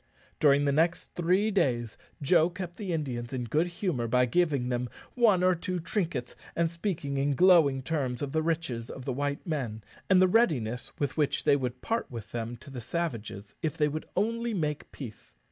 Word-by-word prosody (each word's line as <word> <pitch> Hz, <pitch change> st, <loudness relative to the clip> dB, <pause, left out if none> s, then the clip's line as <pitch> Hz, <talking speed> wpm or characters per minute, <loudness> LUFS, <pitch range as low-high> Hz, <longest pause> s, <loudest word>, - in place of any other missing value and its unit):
During 145 Hz, -1 st, +5 dB
the 140 Hz, -, +3 dB
next 165 Hz, +4 st, +1 dB
three 185 Hz, +5 st, +2 dB
days 120 Hz, -, +1 dB, 0.3 s
Joe 165 Hz, +3 st, +4 dB
kept 175 Hz, -1 st, -7 dB
the 200 Hz, -4 st, -4 dB
Indians 130 Hz, -7 st, -3 dB
in 125 Hz, -2 st, -2 dB
good 150 Hz, +9 st, +1 dB
humour 175 Hz, -, -2 dB
by 125 Hz, +2 st, +3 dB
giving 140 Hz, -2 st, +1 dB
them 125 Hz, 0 st, -1 dB, 0.2 s
one 215 Hz, -7 st, +4 dB
or 185 Hz, 0 st, +5 dB
two 180 Hz, +1 st, -3 dB
trinkets, 165 Hz, -, -2 dB, 0.2 s
and 165 Hz, -1 st, +1 dB
speaking 165 Hz, -6 st, -3 dB
in 140 Hz, +1 st, +1 dB
glowing 160 Hz, -6 st, +5 dB
terms 135 Hz, -4 st, -2 dB
of 140 Hz, -, -3 dB
the 160 Hz, -, +1 dB
riches 155 Hz, -8 st, -2 dB
of 130 Hz, -, -8 dB
the 130 Hz, -, -1 dB
white 140 Hz, +2 st, -2 dB
men, 125 Hz, -, -3 dB, 0.3 s
and 190 Hz, -1 st, +6 dB
the 185 Hz, -, +6 dB
readiness 135 Hz, -, +1 dB
with 145 Hz, 0 st, -2 dB
which 150 Hz, -2 st, +1 dB
they -, -, +5 dB
would 125 Hz, -2 st, -3 dB
part 230 Hz, +1 st, -1 dB
with 115 Hz, -4 st, -8 dB
them 120 Hz, 0 st, -4 dB
to 140 Hz, -, -11 dB
the 125 Hz, -2 st, -6 dB
savages 115 Hz, -, -4 dB
if 155 Hz, -, -2 dB
they 150 Hz, -, +3 dB
would 155 Hz, +2 st, -4 dB
only 230 Hz, +3 st, 0 dB
make 150 Hz, -4 st, -2 dB
peace. 115 Hz, -, -10 dB
150 Hz, 195 wpm, -29 LUFS, 125-175 Hz, 0.3 s, and